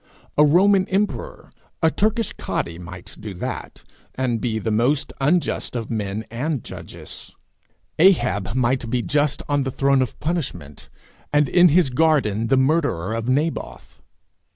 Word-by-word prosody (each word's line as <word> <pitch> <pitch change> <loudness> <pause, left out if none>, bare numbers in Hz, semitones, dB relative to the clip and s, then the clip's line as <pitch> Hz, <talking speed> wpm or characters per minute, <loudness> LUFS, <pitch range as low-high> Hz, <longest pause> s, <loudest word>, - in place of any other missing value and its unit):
A 150 - +6
Roman 185 +5 +4
emperor, 200 +2 -2 0.3
a 160 - +5
Turkish 220 +3 0
cadi, 85 0 -4
might 90 +1 -10
do 105 -3 -7
that, - - -6 0.3
and 125 -3 -1
be 115 -3 -1
the 110 0 -2
most 125 +7 +1
unjust 160 +6 +1
both 120 -2 -2
of 110 - -10
men 105 0 -3
and 135 +2 -2
judges. - - -9 0.6
Ahab 120 - +3
might 125 -1 +1
be 125 0 0
just 145 0 0
on 145 -1 +1
the 135 - -1
throne 135 +1 +2
of 125 - -3
punishment, 125 - -4 0.4
and 145 -1 +3
in 175 +6 +6
his 160 -3 +3
garden 125 -7 +2
the 135 - +3
murderer 130 - +1
of 115 +2 -2
Naboth. 150 +5 -2
130 Hz, 150 wpm, -22 LUFS, 110-155 Hz, 0.6 s, A